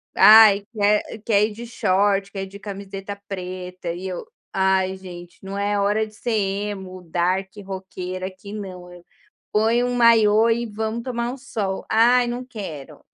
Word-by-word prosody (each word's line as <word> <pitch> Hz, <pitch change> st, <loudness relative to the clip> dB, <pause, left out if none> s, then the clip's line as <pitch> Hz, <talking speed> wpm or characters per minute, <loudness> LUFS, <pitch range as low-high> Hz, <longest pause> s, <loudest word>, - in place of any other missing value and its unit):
ai 210 Hz, -2 st, +8 dB
quer 210 Hz, 0 st, +2 dB, 0.2 s
quer 210 Hz, -2 st, +4 dB
ir -, -, -8 dB
de 235 Hz, +2 st, -8 dB
short, 200 Hz, -3 st, +1 dB
quer 195 Hz, -1 st, -4 dB
ir -, -, -6 dB
de 200 Hz, +1 st, -11 dB
camiseta 200 Hz, 0 st, -7 dB
preta 180 Hz, -2 st, -5 dB
e 185 Hz, +2 st, -6 dB
eu: 180 Hz, -2 st, -5 dB, 0.3 s
"Ai 190 Hz, 0 st, +1 dB
gente, 175 Hz, -2 st, -11 dB
não 195 Hz, +1 st, -6 dB
é 205 Hz, 0 st, 0 dB
hora 210 Hz, +2 st, +1 dB
de 215 Hz, -, -15 dB
ser 235 Hz, +2 st, -4 dB
emo, 195 Hz, -2 st, -2 dB
dark, 185 Hz, +3 st, 0 dB, 0.2 s
rockeira 185 Hz, -1 st, -5 dB
aqui 195 Hz, +2 st, -10 dB
não", 185 Hz, -4 st, -8 dB
eu 175 Hz, 0 st, -14 dB, 0.5 s
ponho 230 Hz, +3 st, +2 dB
um 245 Hz, -, -2 dB
maiô 225 Hz, -1 st, +5 dB
e 235 Hz, +1 st, +1 dB
vamos 220 Hz, +2 st, -4 dB
tomar 240 Hz, -1 st, -2 dB
um 270 Hz, -, -7 dB
sol. 205 Hz, -7 st, -4 dB
"Ai 240 Hz, +2 st, +4 dB
não 245 Hz, +1 st, -3 dB
quero", 190 Hz, -, -8 dB
200 Hz, 170 wpm, -22 LUFS, 190-220 Hz, 0.5 s, ai